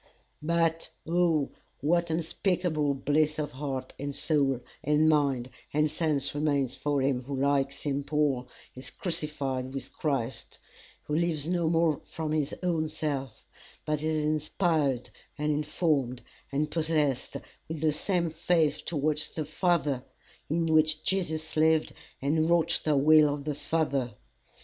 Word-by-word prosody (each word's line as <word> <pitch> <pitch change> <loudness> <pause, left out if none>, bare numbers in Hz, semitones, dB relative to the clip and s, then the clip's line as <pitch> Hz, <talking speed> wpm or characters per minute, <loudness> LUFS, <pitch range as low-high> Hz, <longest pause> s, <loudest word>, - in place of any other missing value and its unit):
"But 165 +1 +1 0.2
oh 165 -4 +2 0.3
what 170 +4 +2
unspeakable 160 -2 0
bliss 150 +3 +1
of 150 -1 -2
heart 135 -2 -4
and 140 0 -3
soul 140 -5 +1 0.2
and 150 +2 +3
mind 140 -5 +2 0.2
and 150 0 +3
sense 150 -4 0
remains 145 -3 0
for 145 -2 0
him 130 -2 0
who 135 0 -3
like 140 0 +2
St. 140 0 -2
Paul 140 -4 0 0.3
is 130 +1 -6
crucified 135 -5 -3
with 135 -1 -6
Christ, 135 -5 -2 0.5
who 150 - -5
lives 160 -2 +1
no 170 -2 +1
more 165 -2 +2
from 160 -2 -4
his 155 -2 0
own 165 -3 +1
self, 145 -6 -4 0.4
but 150 -1 -1
is 155 -1 0
inspired 155 -3 0 0.3
and 150 +1 0
informed 145 -5 0 0.3
and 150 +2 0
possessed 155 -5 0 0.3
with 155 -1 -5
the 155 -1 +3
same 170 +2 0
faith 160 -2 +1
towards 155 -1 -1
the 155 - -4
Father 155 -5 +1 0.5
in 165 +2 +1
which 155 -1 +3
Jesus 160 -4 -1
lived 160 0 +3 0.3
and 155 +4 +1
wrought 170 0 +3
the 150 -2 +2
will 150 +1 +6
of 145 0 -4
the 150 0 -2
Father! 140 -6 -1
150 Hz, 140 wpm, -29 LUFS, 140-160 Hz, 0.5 s, will